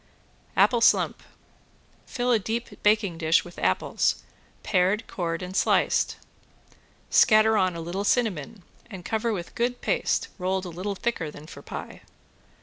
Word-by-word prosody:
~APPLE 240 -2 +4
SLUMP~ - - +3 0.9
Fill 250 -1 -1
a 230 - +4
deep 230 +4 -5
baking 210 -5 +2
dish 160 0 +3
with 175 - -11
apples, 95 +1 0 0.4
pared, 190 +5 +1
cored 170 -1 -3
and 180 +1 -7
sliced. - - +2 1.0
Scatter 215 0 +5
on 185 -4 +2
a 165 - -5
little 175 +4 -3
cinnamon 205 - -1 0.3
and 190 -5 -9
cover 225 +1 -1
with 175 -5 -5
good 245 +1 -1
paste - - 0
rolled 185 +1 -1
a - - -5
little 185 +4 -4
thicker 190 -7 -2
than 150 0 -12
for - - -11
pie. - - -8
190 Hz, 145 wpm, -26 LUFS, 175-225 Hz, 1.0 s, Scatter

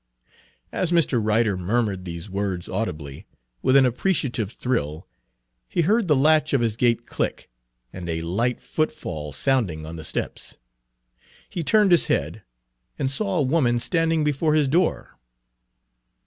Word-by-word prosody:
As 180 -2 -1
Mr. 150 -9 +2
Ryder 110 -1 +2
murmured 95 0 -1
these 85 +1 -6
words 95 -2 -3
audibly, 80 -9 -4 0.3
with 130 - +3
an 135 -1 +7
appreciative 125 - 0
thrill, 80 - -2 0.6
he - - +1
heard 210 +5 +2
the 150 - +4
latch 150 +2 +3
of 135 - +3
his 115 -2 0
gate 120 0 +1
click, - - -3 0.5
and 90 -2 -6
a 80 0 -2
light 115 +9 -1
footfall 90 - -3
sounding 90 - 0
on 80 +1 -7
the 80 - -7
steps. - - -4 0.9
He 170 - -4
turned 210 +3 +4
his 175 - +6
head, 80 +8 -1 0.6
and 135 -1 0
saw 195 +5 -1
a 150 - +3
woman 130 -4 +2
standing 165 +4 +1
before 150 +1 +1
his 150 -3 +3
door. 165 +5 0
120 Hz, 145 wpm, -24 LUFS, 95-155 Hz, 0.9 s, an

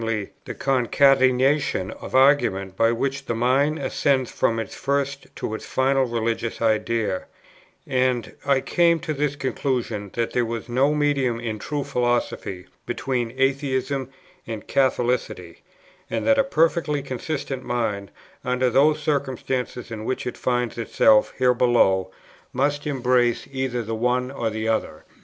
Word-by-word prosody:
the 115 -3 -4
concatenation 130 -3 +3
of - - -8
argument 130 -9 +3
by 115 +3 +3
which 135 +3 -2
the 115 - -2
mind 135 +6 +2
ascends 130 -5 0
from 115 - +1
its 115 - -5
first 140 0 -2
to - - -4
its 110 - -5
final 135 0 +1
religious 115 -1 -2
idea; 110 -3 0 0.6
and 125 -2 0
I 140 -1 +2
came 170 +2 +3
to 155 - -3
the 150 0 0
conclusion 125 -6 -2
that 115 -1 -1
there 125 - +2
was 115 0 -4
no 135 +5 +2
medium, 140 -5 +1
in 110 -2 -4
true 145 +5 -3
philosophy, 120 -7 -1 0.2
between 125 -2 -2
Atheism 135 0 0 0.4
and 110 -2 -6
Catholicity, 125 -9 0 0.5
and - - -2
that 280 0 +4
a - - +5
perfectly 160 - +1
consistent 135 0 -4
mind, 110 -5 -2 0.3
under 125 0 +1
those 150 +4 +3
circumstances 130 -4 -2
in 110 -1 -5
which 130 - -3
it 125 - -4
finds 125 -1 -1
itself 265 - +4
here 125 -1 +4
below, 115 -7 +3 0.4
must 145 +3 0
embrace 125 -3 +1
either 130 -3 -2
the 115 +1 -4
one 125 +3 0
or 120 -4 -2
the 110 0 -3
other. 110 0 -2
125 Hz, 140 wpm, -23 LUFS, 115-140 Hz, 0.6 s, a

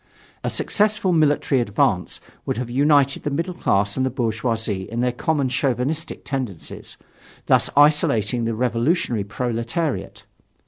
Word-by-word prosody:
A - - 0
successful 210 -3 +1
military 145 -4 +2
advance 100 -4 0 0.3
would - - -1
have 120 -1 -4
united 140 +1 +3
the 150 - -2
middle 165 +6 -2
class 100 - +1
and 130 - +1
the 130 - +1
bourgeoisie 115 -4 -2
in 115 +1 -2
their 125 0 +2
common 140 +2 0
chauvinistic 135 +4 -2
tendencies, 130 - -5 0.5
thus - - +3
isolating 125 -6 +3
the 115 -1 -1
revolutionary 120 - 0
proletariat. 120 +8 -3
125 Hz, 130 wpm, -22 LUFS, 115-150 Hz, 0.5 s, united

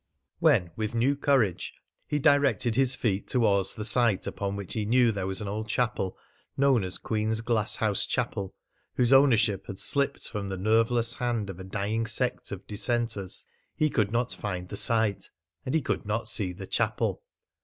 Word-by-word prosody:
When, 120 - +3
with 110 +2 -3
new 130 +5 +2
courage, 135 -10 0 0.3
he 150 - -1
directed 140 - +2
his 135 0 +3
feet 105 -7 -1
towards 100 -6 +1
the 105 - -5
site, 115 -3 +2
upon 100 -1 -3
which 100 -3 -6
he 110 - -2
knew 120 +2 +3
there 95 -3 -3
was 95 +1 -2
an 105 - -4
old 110 +2 -4
chapel 110 -5 -1 0.4
known 135 -5 +3
as 90 -1 -4
Queen's 110 0 -2
Glasshouse 110 -2 0
Chapel, 95 -1 -3 0.4
whose 125 +1 +3
ownership 115 -7 +4
had 100 - -7
slipped 140 +4 -1
from 105 -3 -5
the 95 -1 -4
nerveless 115 +4 +2
hand 120 -5 -2
of 95 - -12
a - - -7
dying 105 +4 -2
sect 125 +3 -1
of 100 -2 -7
dissenters, 110 -2 -1 0.3
he 155 -1 +1
could 105 -4 0
not 120 +1 0
find 90 -3 -5
the - - -6
site, 110 -1 +4 0.4
and 130 - -1
he 160 - +3
could - - -2
not 110 +3 -3
see 95 -4 +1
the 95 +2 -8
chapel. - - -1
110 Hz, 175 wpm, -27 LUFS, 100-120 Hz, 0.4 s, ownership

